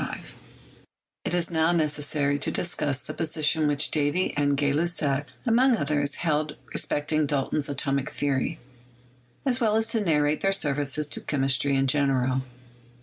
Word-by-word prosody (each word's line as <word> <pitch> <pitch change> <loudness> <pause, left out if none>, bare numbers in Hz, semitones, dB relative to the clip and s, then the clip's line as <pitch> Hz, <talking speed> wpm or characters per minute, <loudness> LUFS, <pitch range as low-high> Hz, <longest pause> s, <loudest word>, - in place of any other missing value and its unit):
188 - - -6
CHEMISTRY - - -21 0.4
It - - 0
is 175 0 -2
now 160 0 +2
necessary 145 -3 +1
to - - 0
discuss 145 -5 -1
the - - -7
position 155 -1 +1
which 145 0 +2
Davy 150 +4 0
and 145 -1 +1
Gay 140 0 +1
Lussac, 150 -3 +1 0.2
among 245 +1 +3
others, 145 -2 -1
held 150 -2 -1 0.2
respecting 150 +1 0
Dalton's 140 +1 -1
atomic 140 0 -1
theory, 145 +3 -2 0.9
as 255 -1 +1
well 215 -2 +2
as 225 0 +2
to 225 - +1
narrate 150 -5 +1
their 195 - +2
services 145 -4 0
to 145 - -6
chemistry 135 0 +1
in 135 0 +2
general. 130 -2 +1
150 Hz, 150 wpm, -25 LUFS, 140-160 Hz, 0.9 s, among